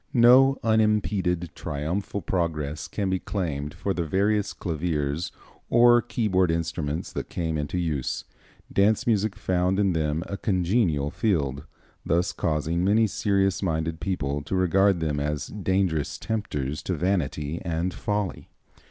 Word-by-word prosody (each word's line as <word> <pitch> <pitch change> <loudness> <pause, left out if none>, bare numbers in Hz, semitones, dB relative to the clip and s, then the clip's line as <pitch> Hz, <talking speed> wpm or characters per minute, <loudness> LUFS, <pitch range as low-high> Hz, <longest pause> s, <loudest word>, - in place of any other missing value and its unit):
No 130 +3 +7
unimped 105 -6 +1
triumphal 90 +7 -3
progress 75 -5 -2
can 100 -3 -2
be 95 - +1
claimed 75 -8 -3
for 100 - -2
the 85 - -1
various 100 +5 +1
claviers 80 -2 -2 0.4
or 120 0 +6
keyboard 100 -7 +1
instruments 80 -1 -2
that - - -4
came 80 -2 -2
into 75 +3 -2
use. 80 -7 -2 0.5
Dance 100 +2 +3
music 110 -2 +1
found 95 -2 0
in 100 -3 +2
them 80 0 0
a 100 - -5
congenial 90 - +1
field, 75 - 0 0.4
thus 85 +2 +1
causing 80 +2 -1
many 105 +4 +4
serious 100 -3 +1
minded 80 -3 -1
people 75 -7 -2
to 85 - -3
regard 95 0 +3
them 75 -2 -1
as 75 0 -2
dangerous 95 -6 -1
tempters 75 -10 -3
to 90 - -2
vanity 80 -3 -1
and 85 +2 -1
folly. 105 -2 -3
90 Hz, 135 wpm, -26 LUFS, 80-100 Hz, 0.5 s, No